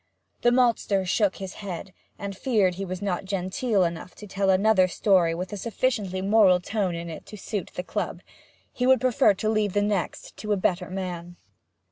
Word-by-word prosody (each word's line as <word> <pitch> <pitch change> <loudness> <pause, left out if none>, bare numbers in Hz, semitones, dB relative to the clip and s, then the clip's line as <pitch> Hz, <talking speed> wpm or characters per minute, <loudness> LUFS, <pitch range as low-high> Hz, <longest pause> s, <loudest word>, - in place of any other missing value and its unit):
The 240 - +5
maltster 235 -6 +2
shook 195 +2 +1
his 190 -1 -7
head, 190 -1 -6 0.2
and 200 -1 -5
feared 205 -5 +2
he 195 +2 -5
was 185 +1 -5
not 195 -2 -1
genteel 195 +3 0
enough 170 +1 -4
to 210 - -10
tell 195 -1 -1
another 190 0 +4
story 180 -3 +2
with 180 +3 -5
a - - -3
sufficiently 205 -3 -1
moral 195 -3 +5
tone 190 -1 -2
in 170 0 -5
it 160 -2 -8
to 210 - -9
suit 200 -1 -4
the 180 - -3
club; - - -3 0.5
he 250 - 0
would 260 0 +6
prefer 255 -4 +3
to 215 - -3
leave 215 -3 +1
the 205 - +2
next 205 -5 -2
to 210 -1 -1
a - - +1
better 180 -1 0
man. 175 -2 -5
195 Hz, 190 wpm, -26 LUFS, 180-215 Hz, 0.5 s, would